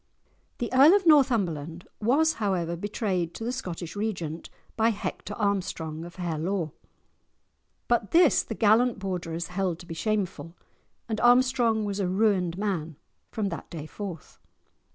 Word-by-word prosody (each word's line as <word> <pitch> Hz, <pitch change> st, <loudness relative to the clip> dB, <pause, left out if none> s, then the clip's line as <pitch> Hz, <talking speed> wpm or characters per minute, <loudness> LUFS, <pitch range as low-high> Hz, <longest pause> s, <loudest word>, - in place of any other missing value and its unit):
The 240 Hz, +1 st, -4 dB
Earl 285 Hz, +8 st, +8 dB
of 400 Hz, -2 st, +1 dB
Northumberland, 185 Hz, -, +2 dB
was 295 Hz, +9 st, +3 dB
however 175 Hz, -5 st, 0 dB
betrayed 185 Hz, -2 st, -2 dB
to -, -, -6 dB
the 235 Hz, -, -1 dB
Scottish 180 Hz, -9 st, -6 dB
Regent 175 Hz, -7 st, -4 dB, 0.3 s
by 225 Hz, 0 st, +3 dB
Hector 205 Hz, -1 st, -4 dB
Armstrong 170 Hz, -6 st, -2 dB
of 175 Hz, -, -11 dB
Harelaw; 170 Hz, -1 st, -2 dB, 1.2 s
but 235 Hz, -4 st, +1 dB
this 335 Hz, -3 st, +5 dB
the 225 Hz, -, -6 dB
gallant 225 Hz, +3 st, +3 dB
Borderers 175 Hz, -4 st, -4 dB
held 180 Hz, -2 st, -1 dB
to 175 Hz, -, -12 dB
be 170 Hz, -, -7 dB
shameful, 185 Hz, -3 st, -2 dB, 0.5 s
and 220 Hz, -2 st, -2 dB
Armstrong 240 Hz, -3 st, +4 dB
was 200 Hz, 0 st, -3 dB
a 195 Hz, -, 0 dB
ruined 185 Hz, -3 st, +1 dB
man 175 Hz, -7 st, -2 dB, 0.3 s
from 210 Hz, -3 st, -2 dB
that 170 Hz, -, -7 dB
day 155 Hz, -3 st, -7 dB
forth. 180 Hz, -2 st, -8 dB
200 Hz, 140 wpm, -27 LUFS, 170-225 Hz, 1.2 s, Earl